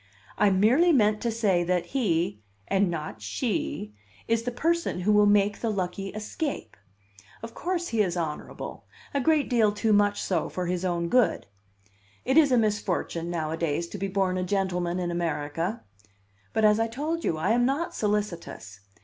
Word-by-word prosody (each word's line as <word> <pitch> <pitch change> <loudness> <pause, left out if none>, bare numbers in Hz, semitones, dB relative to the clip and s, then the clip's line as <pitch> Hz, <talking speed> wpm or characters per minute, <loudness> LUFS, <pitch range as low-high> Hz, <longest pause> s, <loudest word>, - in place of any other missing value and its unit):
I 210 - +4
merely 230 - +4
meant 210 -7 +3
to 235 - 0
say 205 -6 +1
that 175 0 0
he, 175 - 0 0.3
and 195 -1 +2
not 155 -10 -5
she, 100 0 -3 0.3
is 230 0 +2
the 245 +2 -3
person 330 - 0
who 210 +4 +2
will 210 0 +5
make 205 0 +3
the 230 - -1
lucky 195 -1 -3
escape. 215 +9 -5 0.7
Of 230 - -7
course, 350 -1 -2
he 225 -2 +1
is 180 -3 0
honorable 160 -3 -5 0.3
a 280 - +1
great 310 +1 +2
deal 225 -4 +3
too 210 +1 +1
much 205 0 +3
so 175 -4 -1
for 180 - -3
his 180 +1 -2
own 170 -2 0
good. 250 +6 +2 0.8
It 265 - +1
is 305 -4 +6
a 250 - +5
misfortune, 205 -6 -1
nowadays, 165 -1 -2
to 205 - -7
be 195 - -1
born 190 -1 0
a - - -1
gentleman 180 -2 -1
in 175 -1 -2
America. 165 +3 -2 0.7
But, 220 - +2
as 210 +1 +5
I 225 - +2
told 305 +8 -3
you, 160 - 0
I 155 - 0
am 240 +1 +3
not 290 +5 -1
solicitous. 195 - -3
200 Hz, 175 wpm, -27 LUFS, 175-230 Hz, 0.8 s, is